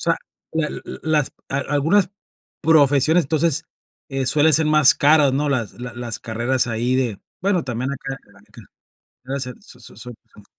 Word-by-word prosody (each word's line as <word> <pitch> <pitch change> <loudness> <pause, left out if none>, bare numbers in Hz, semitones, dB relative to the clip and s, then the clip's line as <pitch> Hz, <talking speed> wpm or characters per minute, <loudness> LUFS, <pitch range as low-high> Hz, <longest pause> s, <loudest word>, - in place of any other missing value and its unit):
sea, - - +1 0.4
la 160 -1 0
l - - -7 0.2
las 155 -3 0 0.2
a 135 - -1
algunas 150 +8 +1 0.5
profesiones, 155 +1 +4
entonces, 155 +1 0 0.4
eh, 135 -1 -2
suelen 150 +4 +3
ser 155 +1 +4
más 155 -2 +5
caras, 145 -1 +4
¿no?, 145 +2 0
las 120 -7 -1
la 125 0 -8
las 120 -2 -4
carreras 120 +3 -1
ahí 120 +2 -1
de 120 -6 -1 0.2
bueno, 190 -1 +1
también 125 +2 -3
acá, 135 0 -6
te 100 - -24
la 100 - -20
aniquila. 100 - -17 0.6
Gracias, 130 -2 -4
so 125 - -15
so - - -13
son 120 +1 -9 0.2
son 105 - -17
135 Hz, 175 wpm, -21 LUFS, 125-155 Hz, 0.6 s, más